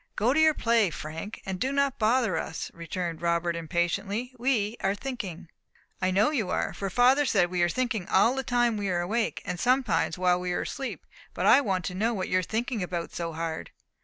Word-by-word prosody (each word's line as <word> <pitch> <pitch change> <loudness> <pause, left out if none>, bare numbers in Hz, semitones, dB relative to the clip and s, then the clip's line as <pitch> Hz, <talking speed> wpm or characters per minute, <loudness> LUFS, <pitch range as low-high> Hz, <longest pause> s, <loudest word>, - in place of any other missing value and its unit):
"Go 235 +5 +2
to 305 - +2
your 315 -1 +5
play, 230 -4 +3
Frank, 160 +6 -7
and 190 -1 -4
do 265 - 0
not 280 -1 +1
bother 225 -3 +2
us," 160 - -4
returned 170 0 -4
Robert, 170 0 0
impatiently; 195 +8 -2
"we 235 -4 +1
are 195 +1 0
thinking." 200 -8 -6 0.5
"I 185 - +2
know 205 +8 +3
you 225 -11 -1
are; - - -1
for 195 - -4
father 255 +7 +4
said 190 -9 +2
we 180 -1 0
are 175 - +3
thinking 230 -3 -1
all 215 +6 +4
the 265 - -1
time 240 -3 +1
we 200 -1 -2
are 175 -1 0
awake, 220 +6 -1
and 175 - -4
sometimes 250 -8 +1
while 180 -1 +2
we 180 0 -2
are - - -1
asleep. 270 -1 -5 0.3
But - - -1
I - - +7
want 190 -7 -1
to 180 - -3
know 225 +5 0
what 185 -2 -3
you 185 - +3
are - - 0
thinking 225 +4 -2
about 175 -2 -4
so 170 -1 -4
hard." 160 0 -4
200 Hz, 215 wpm, -27 LUFS, 175-245 Hz, 0.5 s, I